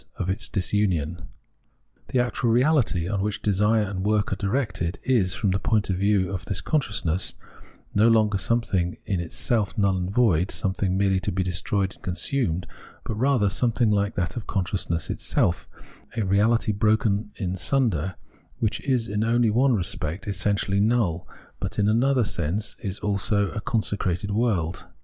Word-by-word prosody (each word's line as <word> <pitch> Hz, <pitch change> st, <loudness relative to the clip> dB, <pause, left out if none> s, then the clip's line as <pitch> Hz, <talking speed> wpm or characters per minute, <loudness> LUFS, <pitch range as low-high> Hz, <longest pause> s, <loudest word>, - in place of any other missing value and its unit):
of 95 Hz, -, -2 dB
its 95 Hz, -, -1 dB
disunion. 90 Hz, -4 st, -1 dB, 0.8 s
The -, -, -1 dB
actual 120 Hz, 0 st, 0 dB
reahty, 125 Hz, -, +2 dB
on 100 Hz, 0 st, -1 dB
which 105 Hz, 0 st, -2 dB
desire 105 Hz, +2 st, +2 dB
and 95 Hz, -2 st, -4 dB
work 105 Hz, -1 st, +1 dB
are -, -, 0 dB
directed, 100 Hz, -4 st, -2 dB
is, 100 Hz, -8 st, +2 dB
from 100 Hz, -, 0 dB
the 95 Hz, -, 0 dB
point 105 Hz, -3 st, +1 dB
of -, -, 0 dB
view 100 Hz, -1 st, +2 dB
of 90 Hz, -3 st, -4 dB
this 100 Hz, -3 st, -2 dB
consciousness, 100 Hz, -, -1 dB, 0.6 s
no 105 Hz, +3 st, +4 dB
longer 110 Hz, -3 st, +3 dB
something 95 Hz, -4 st, 0 dB
in 95 Hz, -4 st, -1 dB
itself 100 Hz, +5 st, -1 dB
null 100 Hz, -2 st, +2 dB
and 90 Hz, 0 st, -2 dB
void, 95 Hz, -6 st, +2 dB
something 95 Hz, -1 st, 0 dB
merely 95 Hz, -1 st, +2 dB
to -, -, -2 dB
be 95 Hz, +1 st, 0 dB
destroyed 95 Hz, +2 st, -1 dB
and -, -, -21 dB
consumed; 90 Hz, -1 st, -1 dB, 0.4 s
but -, -, -4 dB
rather 120 Hz, -1 st, +2 dB
something 115 Hz, +2 st, +1 dB
hke 100 Hz, 0 st, +1 dB
that 90 Hz, -3 st, -2 dB
consciousness 90 Hz, -4 st, -1 dB
itself, 80 Hz, -8 st, 0 dB, 0.5 s
a -, -, +1 dB
reahty 105 Hz, +3 st, +2 dB
broken 105 Hz, -1 st, +1 dB
in 95 Hz, -4 st, -3 dB
sunder, 95 Hz, -, 0 dB, 0.4 s
which 110 Hz, -, -1 dB
is 125 Hz, -4 st, 0 dB
only 115 Hz, +3 st, +2 dB
in -, -, -1 dB
one 130 Hz, +2 st, +3 dB
respect 90 Hz, -1 st, -2 dB
essentially 100 Hz, 0 st, 0 dB
null, 105 Hz, -6 st, +1 dB, 0.3 s
but -, -, -4 dB
in 105 Hz, -, +2 dB
another 125 Hz, +4 st, +3 dB
sense 100 Hz, +3 st, -2 dB, 0.3 s
also 100 Hz, 0 st, +1 dB
a 105 Hz, -, -4 dB
consecrated 100 Hz, -3 st, -1 dB
world. 100 Hz, -6 st, -1 dB
100 Hz, 155 wpm, -25 LUFS, 95-110 Hz, 0.8 s, no